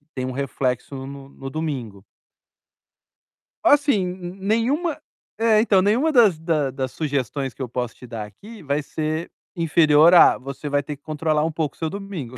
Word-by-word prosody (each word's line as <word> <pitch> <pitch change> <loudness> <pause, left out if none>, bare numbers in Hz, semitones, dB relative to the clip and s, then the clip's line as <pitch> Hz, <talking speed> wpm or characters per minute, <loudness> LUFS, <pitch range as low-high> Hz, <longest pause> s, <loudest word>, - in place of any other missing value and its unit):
tem 130 - -2
um 130 - -3
reflexo 135 0 -2
no 140 0 -10
no 135 -1 -8
domingo. 130 -10 -5 1.6
Assim, 280 -9 +4
n 180 +1 -6
nenhuma 260 - 0 0.4
é, 225 -2 +4
então 200 -4 +4
nenhuma 235 +11 +2
das 220 - +5
da 160 -4 0
das 130 -1 -4
sugestões 140 -3 -2
que - - -12
eu 130 - -3
posso 125 -1 -3
te - - -13
dar 115 -3 -6
aqui 205 - -13
vai 145 0 -1
ser 155 +3 -3 0.2
inferior 160 -1 +5
a: 175 - +7
"Você 140 +3 -7
vai 145 0 0
ter 145 +1 -6
que 140 - -45
controlar 155 0 0
um 165 - -1
pouco 155 -3 -3
o - - -26
seu 160 - -1
domingo". 175 - -7
155 Hz, 175 wpm, -22 LUFS, 135-190 Hz, 1.6 s, a